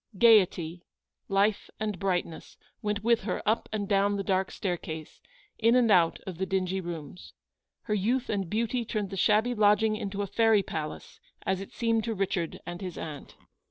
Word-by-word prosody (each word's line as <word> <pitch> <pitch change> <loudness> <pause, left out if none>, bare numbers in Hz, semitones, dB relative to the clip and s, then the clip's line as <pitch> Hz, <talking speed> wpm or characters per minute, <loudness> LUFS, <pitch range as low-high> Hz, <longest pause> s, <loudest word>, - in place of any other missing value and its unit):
Gaiety, 185 -6 +4 0.5
life, 200 +2 +1
and 210 -4 -2
brightness, 180 -4 -2 0.2
went 210 -1 -2
with 235 0 +3
her - - -3
up 220 +2 +1
and 210 -2 -2
down 200 0 +2
the 200 - -2
dark 190 -1 +1
staircase 160 -4 -5 0.2
— - - -30
in 230 +2 +4
and 240 -3 +4
out 170 -4 +4
of 180 -3 -7
the 190 - 0
dingy 190 0 -1
rooms. 170 -1 -8 0.5
Her 210 - -2
youth 235 +6 +1
and 195 -4 -2
beauty 230 +3 0
turned 210 -3 -3
the - - -4
shabby 215 +5 +3
lodging 215 0 +3
into 200 -1 -3
a - - -1
fairy 220 0 +3
palace, 155 -3 -6 0.3
as 190 0 0
it 195 - -9
seemed 230 -1 0
to 225 -1 -2
Richard 185 -4 -2
and 175 +1 -6
his 185 -3 -6
aunt. 150 -3 -7
200 Hz, 180 wpm, -28 LUFS, 185-215 Hz, 0.5 s, Gaiety